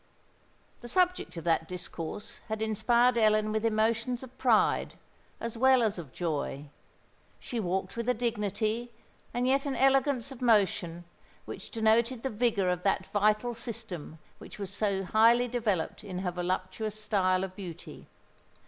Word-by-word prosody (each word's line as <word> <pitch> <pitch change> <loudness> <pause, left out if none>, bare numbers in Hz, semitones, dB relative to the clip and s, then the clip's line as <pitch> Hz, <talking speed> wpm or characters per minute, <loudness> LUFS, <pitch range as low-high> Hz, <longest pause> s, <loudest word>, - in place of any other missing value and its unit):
The 240 - -9
subject 360 - +1
of 165 - -5
that 165 -1 +1
discourse 180 +1 -6
had 220 0 -2
inspired 235 +3 +3
Ellen 215 -1 +3
with 215 0 -1
emotions 230 +3 +1
of 260 -1 -12
pride, 235 -5 +2 0.4
as 230 0 -5
well 260 -1 +5
as 210 -4 0
of 150 -6 -9
joy. 145 -3 -3 0.7
She 240 - -4
walked 190 -1 -2
with 235 +1 -2
a 250 - +3
dignity 220 0 -1 0.4
and 245 +1 -1
yet 275 +2 +2
an 270 - -1
elegance 270 -1 +2
of 260 - -10
motion 190 -7 +2 0.4
which - - -8
denoted 230 +2 +2
the 265 - -1
vigour 215 -4 +1
of 180 -1 -1
that 190 0 0
vital 215 +3 +2
system 225 -9 -6 0.2
which - - -11
was 200 -2 -5
so 195 -1 0
highly 230 +5 +4
developed 220 -10 -1
in 190 -3 -6
her 185 -1 -2
voluptuous 185 +4 -3
style 190 -3 +1
of 190 -1 -5
beauty. 180 -5 -9
215 Hz, 150 wpm, -29 LUFS, 185-240 Hz, 0.7 s, well